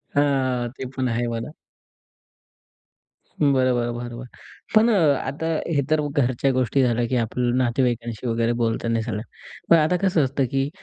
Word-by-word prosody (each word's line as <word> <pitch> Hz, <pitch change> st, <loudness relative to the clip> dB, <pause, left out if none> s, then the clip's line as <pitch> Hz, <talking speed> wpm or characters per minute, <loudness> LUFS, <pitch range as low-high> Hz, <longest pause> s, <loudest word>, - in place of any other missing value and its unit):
हां, 130 Hz, -4 st, +1 dB
ते 130 Hz, -, -5 dB
पण 130 Hz, -1 st, -1 dB
आहे 120 Hz, +1 st, -1 dB
म्हणा. 115 Hz, +3 st, -4 dB, 1.9 s
बरं, 140 Hz, -2 st, +4 dB, 0.2 s
बरं, 120 Hz, 0 st, -1 dB
बरं, 120 Hz, -1 st, -6 dB
बरं. 125 Hz, 0 st, -8 dB, 0.5 s
पण 225 Hz, +2 st, +6 dB
अ, -, -, +3 dB, 0.3 s
आता 145 Hz, +4 st, -4 dB, 0.3 s
हे 140 Hz, -, +3 dB
तर 155 Hz, -1 st, +2 dB
घरच्या 135 Hz, 0 st, +1 dB
गोष्टी 130 Hz, +1 st, +1 dB
झाल्या 120 Hz, -1 st, +1 dB
की 130 Hz, -, -1 dB
आपल्या 120 Hz, +1 st, 0 dB
नातेवाईकांशी 120 Hz, -2 st, -1 dB
वगैरे 115 Hz, 0 st, +1 dB
बोलताना 115 Hz, 0 st, 0 dB
हे -, -, -2 dB
सगळ्या. 110 Hz, -2 st, -3 dB, 0.5 s
पण 170 Hz, -, +8 dB
आता 155 Hz, +3 st, +2 dB
कसं 180 Hz, -6 st, +2 dB
असतं 135 Hz, 0 st, 0 dB
की 135 Hz, +1 st, 0 dB
125 Hz, 160 wpm, -23 LUFS, 120-140 Hz, 1.9 s, पण